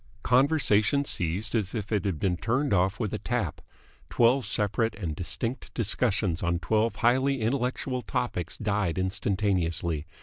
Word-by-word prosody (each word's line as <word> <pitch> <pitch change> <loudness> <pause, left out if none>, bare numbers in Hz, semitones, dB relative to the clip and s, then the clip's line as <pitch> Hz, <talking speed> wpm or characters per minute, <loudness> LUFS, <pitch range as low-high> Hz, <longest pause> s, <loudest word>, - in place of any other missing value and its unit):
Conversation 135 -1 +3
ceased 95 +1 0
as 105 -4 -1
if 105 -1 -4
it 105 -3 0
had 95 -5 -1
been 90 -2 +1
turned 125 +9 0
off 95 +1 +1
with 110 -4 -2
a - - -2
tap. - - -2 0.5
Twelve 125 +2 +3
separate 110 +2 0
and 85 -7 -4
distinct 115 - -3
discussions 105 -5 0
on 85 0 +1
twelve 110 +7 0
highly 130 +3 +2
intellectual 125 +2 -1
topics 120 -10 -3
died 105 -5 -1
instantaneously. 95 -4 -1
105 Hz, 140 wpm, -27 LUFS, 95-125 Hz, 0.5 s, Conversation